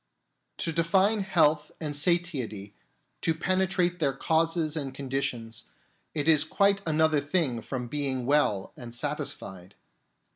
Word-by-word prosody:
To 165 - 0
define 190 +6 +3
health 160 -6 +2
and 150 -2 -3
satiety, 145 - 0 0.5
to 165 - +1
penetrate 180 0 +1
their 140 -4 +1
causes 160 +2 +1
and 135 -4 -4
conditions, 130 -4 -4 0.5
is 150 0 +4
quite 200 +4 +2
another 155 -1 +3
thing 145 -5 0
from 125 +1 -5
being 135 -2 -2
well 125 -9 +1
and 120 -1 -9
satisfied. 95 -4 -5
150 Hz, 115 wpm, -27 LUFS, 130-170 Hz, 0.5 s, is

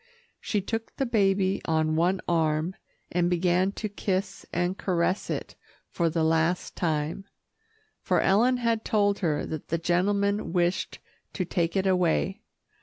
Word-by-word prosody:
She 210 - -1
took 225 +3 -4
the 270 - 0
baby 195 -4 +2
on 155 -1 +1
one 180 +4 +2
arm, 160 +1 +1 0.4
and 175 0 +1
began 180 +2 +2
to 215 - -3
kiss 195 -1 -3
and 175 +2 0
caress 185 0 0
it - - -4 0.4
for 170 -2 +1
the 160 0 0
last 160 +2 +1
time, 160 +2 -1 0.8
for - - +1
Ellen 235 +6 +3
had 230 -2 0
told 205 -2 +2
her 155 -5 0
that 155 -2 -6
the 165 - 0
gentleman 200 +3 +1
wished 175 +1 0 0.4
to 185 - -2
take 170 0 -1
it 190 - +1
away. 185 +2 +1
185 Hz, 145 wpm, -27 LUFS, 165-200 Hz, 0.8 s, Ellen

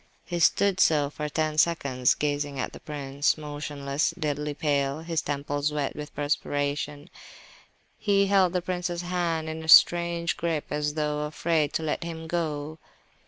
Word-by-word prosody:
He 175 -1 -3
stood 195 +3 +3
so 150 -5 +3
for 150 0 -4
ten 155 0 0
seconds, 140 -7 +2
gazing 145 -1 -2
at - - -3
the - - -10
prince, 145 -1 -1
motionless, 145 0 -3
deadly 150 -2 -2
pale, 140 -1 0
his 165 -2 -1
temples 145 +1 -2
wet 145 -2 -2
with 150 0 -8
perspiration; 145 0 -2 0.9
he 200 -1 +3
held 190 -2 +3
the 180 -1 -1
prince's 180 -1 -3
hand 170 -3 -1
in 160 0 -5
a - - -8
strange 170 +1 +5
grip, 160 -1 -1
as 150 0 -1
though 150 -1 -1
afraid 155 0 0
to 160 - -1
let 155 +2 -2
him 165 -1 -6
go. 155 -2 -3
150 Hz, 155 wpm, -26 LUFS, 145-170 Hz, 0.9 s, strange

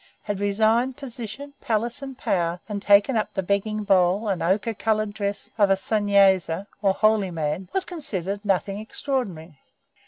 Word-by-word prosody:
had 205 -2 -3
resigned 220 +5 +2
position, 265 +1 -7
palace, 235 +2 -1
and 270 -2 -7
power, 170 -1 -1
and 205 -2 -4
taken 205 +5 +4
up 215 - 0
the 190 - -1
begging 205 +3 -1
bowl 195 +1 +3
and 190 -3 -1
ochre 200 +6 +1
coloured 215 -1 0
dress 200 -1 -4
of 205 -1 +5
a 195 - +5
Sunnyasi, 195 -3 +2 0.2
or 195 -2 +2
holy 215 -2 +3
man, 165 +2 -3
was 385 - 0
considered 205 - -4
nothing 195 0 0
extraordinary. 200 - -4
205 Hz, 155 wpm, -24 LUFS, 190-225 Hz, 0.2 s, of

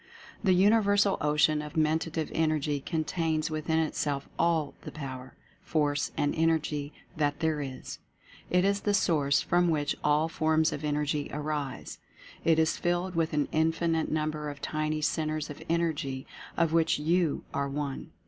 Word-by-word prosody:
The 190 -3 +4
Universal 205 0 +4
Ocean 150 +1 +3
of 150 -1 -8
Mentative 160 0 0
Energy 155 -2 +1
contains 160 +1 -1
within 155 +1 -1
itself 145 -3 -1
all 160 -4 +2
the - - -8
Power, 130 -3 -7 0.3
Force 145 -2 0
and 145 - +1
En 165 0 +3
ergy 150 -2 -1 0.2
that 145 -1 0
there 160 -2 0
is. 135 -2 -7 0.5
It 180 +1 +3
is 200 0 +1
the 205 -1 +1
source 150 -7 +2
from 175 0 +2
which 150 -2 0
all 150 +2 +3
forms 160 0 +1
of 145 - -5
Energy 150 0 -1
arise. 150 -2 -4 0.4
It 165 -1 +4
is 160 0 +2
filled 175 +1 -1
with 165 -2 0
an 150 -1 +1
infinite 165 +1 +1
number 155 -1 -2
of 145 -1 -8
tiny 155 +1 -2
Centres 155 -1 -1
of 145 - -10
Energy, 155 -5 -1 0.3
of 165 -2 +2
which 165 -1 +3
YOU 165 +1 +1
are 140 0 -1
one. 140 -1 -4
155 Hz, 155 wpm, -29 LUFS, 145-165 Hz, 0.5 s, The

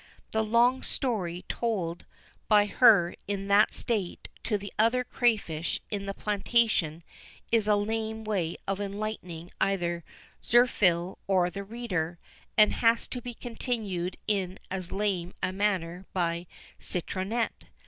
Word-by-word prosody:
The 220 0 +1
long 235 +4 +3
story 185 -9 -2
told 185 -8 -2 0.4
by 210 -1 +6
her 205 -5 +5
in 200 -1 -3
that 205 +2 +5
state 210 -7 -1 0.2
to 210 - +1
the 200 0 -8
other 230 +3 +4
crayfish 210 -11 0
in 200 -1 -3
the 195 - -3
plantation 205 -6 +1 0.5
is 225 -2 +3
a 210 - +5
lame 220 +1 -2
way 190 -6 -1
of 195 +1 -1
enlightening 195 -4 -5
either 175 -3 0 0.4
Zirphil 190 -7 +3
or 180 -2 +3
the 200 +1 -5
reader, 195 -7 -3 0.4
and 215 -1 +6
has 230 0 +3
to 250 - -4
be 245 0 -7
continued 215 -7 -3
in 190 -3 0
as 185 -2 -2
lame 190 -3 -1
a - - +1
manner 190 -3 -1
by 170 -1 -1 0.3
Citronette. 190 +6 -2
200 Hz, 130 wpm, -28 LUFS, 180-220 Hz, 0.5 s, by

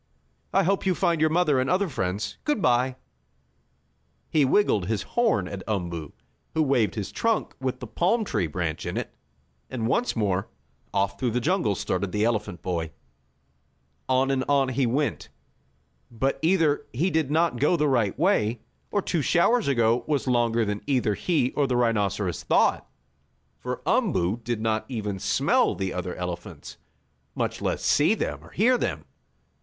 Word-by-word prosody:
"I - - +3
hope 195 +2 0
you 185 - +2
find 170 -3 +1
your 155 - +4
mother 155 -4 +2
and 130 - 0
other 190 +2 +2
friends. 105 - -3
Good 295 -6 0
bye!" 125 -4 +2 1.4
He 155 - +4
wiggled 130 - +2
his 110 -1 -1
horn 225 - +1
at 100 0 -6
Umboo, 85 -7 -3 0.4
who 160 - +3
waved 130 -7 +1
his 105 -4 -4
trunk 230 -1 0
with 130 -1 -2
the - - -6
palm 200 - +1
tree 90 - -1
branch 80 0 -3
in - - -3
it, - - -4 0.6
and 120 -4 -3
once 235 - +1
more, 100 -3 0 0.4
off 100 0 -1
through 125 - +1
the 120 +2 0
jungle 150 - +1
started 95 +1 -2
the 105 +2 +1
elephant 105 -6 -2
boy. 85 -3 -2 1.2
On 130 +1 +3
and 130 -1 0
on 140 -2 +3
he 130 0 +1
went. 140 +5 -1 0.8
But 125 +4 -1
either 160 -4 +2
he 170 +10 0
did 160 -4 +1
not 160 -4 +1
go 150 +5 +3
the 150 -1 +2
right 120 -8 +1
way, 125 - +1 0.3
or 205 - 0
two 165 - 0
showers 210 - +3
ago 120 -3 +2
was 145 -3 0
longer 120 -2 +2
than 105 0 -3
either 125 -6 +1
he 125 - 0
or 145 -2 +1
the 125 -2 0
rhinoceros 100 -6 0
thought, - - +2 0.7
for - - -5
Umboo 90 +6 +1
did 120 -2 -2
not 110 -1 0
even 105 -6 -3
smell - - +2
the 95 -1 -3
other 90 0 -4
elephants, 90 -1 -7 0.6
much - - -2
less - - -1
see 150 +9 +3
them - - -4
or - - -14
hear 245 +4 +2
them. - - -2
125 Hz, 165 wpm, -25 LUFS, 105-155 Hz, 1.4 s, your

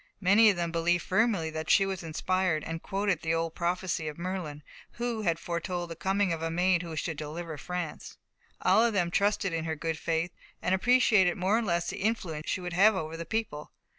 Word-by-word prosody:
Many 205 +3 +6
of 200 - +2
them 170 -1 -2
believed 170 +1 +1
firmly 190 -5 +1
that 155 0 -5
she 195 - +5
was 190 -1 -3
inspired, 170 0 0
and 165 0 -5
quoted 195 -4 -1
the 160 0 0
old 165 0 -1
prophecy 180 -1 -1
of 150 - -5
Merlin, 170 -5 -4 0.3
who 235 -2 -2
had 170 -5 +1
foretold 175 +1 -4
the - - -5
coming 195 0 +1
of 160 - -4
a 165 - -1
maid 175 +1 +2
who 165 -2 -6
should 160 0 -3
deliver 155 +2 -5
France. 175 +1 -5 0.5
All 225 - +5
of 235 -1 +2
them 175 -4 +1
trusted 200 -1 +1
in 165 -1 -2
her 160 -1 -2
good 160 +1 -3
faith, 165 +1 -1 0.3
and 180 - 0
appreciated 210 -3 +4
more 190 +4 +2
or 230 - +2
less 170 -5 -1
the - - -6
influence 180 -8 -2
she 185 - -1
would 175 -1 -5
have 205 +4 +5
over 160 -2 -4
the 165 0 -6
people. 215 -9 -4
175 Hz, 210 wpm, -29 LUFS, 165-195 Hz, 0.5 s, Many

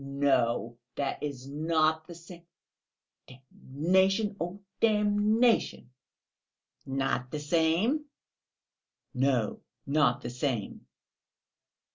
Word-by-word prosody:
No, 125 -4 0 0.2
that 140 -1 -3
is 135 -3 -5
not 155 +2 0
the 170 - -9
same! 170 +1 -12 0.9
(Oh, 130 - -14 0.3
damnation, 190 +8 +2 0.4
damnation!)." 210 - +2 1.0
"Not 135 -2 -1
the 150 - -4
same?" 170 - +1 1.1
"No, 130 -4 0 0.3
not 140 -4 +2
the - - -5
same." 125 -4 -3
150 Hz, 80 wpm, -29 LUFS, 135-190 Hz, 1.1 s, damnation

